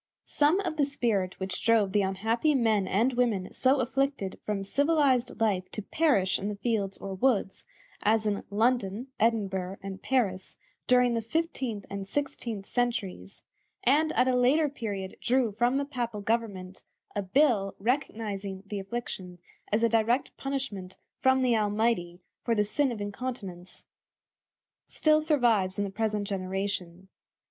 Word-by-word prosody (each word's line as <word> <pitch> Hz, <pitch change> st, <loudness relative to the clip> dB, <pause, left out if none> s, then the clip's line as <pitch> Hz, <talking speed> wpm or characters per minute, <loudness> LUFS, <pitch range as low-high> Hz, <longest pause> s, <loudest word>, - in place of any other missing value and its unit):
Some 300 Hz, +6 st, +2 dB
of 340 Hz, -5 st, -3 dB
the 295 Hz, -, +3 dB
spirit 225 Hz, -10 st, -1 dB
which 190 Hz, -1 st, -4 dB
drove 220 Hz, -4 st, +3 dB
the 205 Hz, -, +3 dB
unhappy 225 Hz, +10 st, +1 dB
men 220 Hz, -6 st, +2 dB
and 235 Hz, +7 st, +2 dB
women 230 Hz, -7 st, 0 dB
so 265 Hz, +2 st, +3 dB
afflicted 265 Hz, -5 st, -1 dB
from 205 Hz, -2 st, -2 dB
civilized 280 Hz, 0 st, +2 dB
life 200 Hz, -5 st, +1 dB
to 215 Hz, -, -4 dB
perish 205 Hz, -, +2 dB
in 200 Hz, -, -3 dB
the 210 Hz, -, -3 dB
fields 200 Hz, -2 st, -1 dB
or 195 Hz, -, -6 dB
woods, 195 Hz, -2 st, 0 dB, 0.4 s
as 220 Hz, +1 st, +2 dB
in 205 Hz, -1 st, -1 dB
London, 225 Hz, +2 st, 0 dB
Edinburgh, 195 Hz, -4 st, 0 dB
and 195 Hz, 0 st, -6 dB
Paris, 200 Hz, -8 st, -1 dB, 0.3 s
during 250 Hz, -1 st, +4 dB
the 230 Hz, -, 0 dB
fifteenth 255 Hz, -, -2 dB
and 200 Hz, -1 st, -6 dB
sixteenth 230 Hz, -5 st, -3 dB
centuries, 205 Hz, -, -3 dB, 0.4 s
and 305 Hz, +5 st, +3 dB
at 255 Hz, -, +3 dB
a 255 Hz, -, +3 dB
later 280 Hz, +5 st, +3 dB
period 200 Hz, -8 st, -5 dB
drew 250 Hz, -2 st, +2 dB
from 240 Hz, +5 st, +1 dB
the 280 Hz, -, 0 dB
Papal 240 Hz, -7 st, -4 dB
government 200 Hz, -4 st, -2 dB, 0.3 s
a 205 Hz, -, 0 dB
bull 200 Hz, -1 st, +2 dB
recognizing 205 Hz, -5 st, -2 dB
the 200 Hz, 0 st, -4 dB
affliction 195 Hz, -3 st, -5 dB, 0.3 s
as 215 Hz, +2 st, +2 dB
a -, -, +6 dB
direct 230 Hz, +3 st, +1 dB
punishment 260 Hz, -10 st, -4 dB, 0.2 s
from 260 Hz, 0 st, +3 dB
the 245 Hz, -2 st, +3 dB
Almighty 210 Hz, -4 st, 0 dB, 0.2 s
for 230 Hz, -, +1 dB
the 210 Hz, -, +3 dB
sin 265 Hz, +6 st, +1 dB
of 220 Hz, -3 st, -5 dB
incontinence, 205 Hz, -4 st, -6 dB, 1.0 s
still 310 Hz, 0 st, +3 dB
survives 235 Hz, -, +2 dB
in 205 Hz, -, +1 dB
the 200 Hz, -, -3 dB
present 210 Hz, 0 st, -1 dB
generation. 190 Hz, -2 st, -3 dB
220 Hz, 150 wpm, -28 LUFS, 195-255 Hz, 1.0 s, a